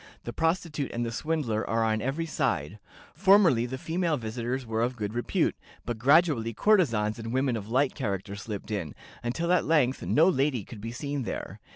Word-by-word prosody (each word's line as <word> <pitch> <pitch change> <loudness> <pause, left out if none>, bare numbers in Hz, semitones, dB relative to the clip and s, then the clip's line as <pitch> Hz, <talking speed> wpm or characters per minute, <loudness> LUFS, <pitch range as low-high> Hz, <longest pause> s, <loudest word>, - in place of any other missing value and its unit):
The 120 - -6
prostitute 160 -3 -1
and 120 0 -1
the 115 - -3
swindler 125 -5 -1
are 115 0 +1
on 110 -1 +1
every 140 +7 -2
side. 110 - -1 0.3
Formerly 175 - +5
the 130 +2 -5
female 165 +2 -1
visitors 120 +2 -3
were 110 0 -1
of 125 +2 0
good 105 -2 -4
repute, 120 0 0 0.3
but 120 -2 -3
gradually 140 -4 +3
courtesans 115 - +2
and 115 0 -5
women 130 -1 +1
of 105 -1 -6
light 130 +3 +2
character 100 -6 -3
slipped 105 0 -6
in, 95 -8 -3 0.3
until 165 +9 0
at 180 - +3
length 140 -5 +2
no 160 +4 +4
lady 135 - +1
could 105 +1 -11
be 115 +2 -5
seen 140 +3 -3
there. 120 - -5
125 Hz, 185 wpm, -28 LUFS, 110-155 Hz, 0.3 s, Formerly